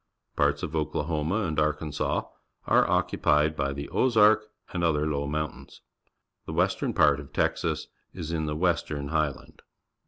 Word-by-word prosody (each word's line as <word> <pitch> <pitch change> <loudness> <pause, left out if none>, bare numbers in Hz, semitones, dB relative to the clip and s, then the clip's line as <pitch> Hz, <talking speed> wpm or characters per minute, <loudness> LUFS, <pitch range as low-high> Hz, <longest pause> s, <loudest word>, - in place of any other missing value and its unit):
Parts 70 +1 +1
of 80 -3 -4
Oklahoma 80 +4 -1
and 80 -6 -1
Arkansas 75 -1 -1 0.4
are - - +3
occupied 75 +1 +2
by 70 -2 -1
the 70 +1 -5
Ozark 110 -3 +4 0.3
and 85 -2 -1
other 75 -3 +2
low 70 -2 -1
mountains. 75 +1 -5 0.7
The 80 - -5
western 90 +4 +1
part 70 -1 +4
of 70 -3 -10
Texas - - 0 0.3
is 85 -3 -6
in 80 -2 -1
the 75 - -2
Western 75 -4 -1
Highland. 75 -3 -2
75 Hz, 145 wpm, -27 LUFS, 75-85 Hz, 0.7 s, Ozark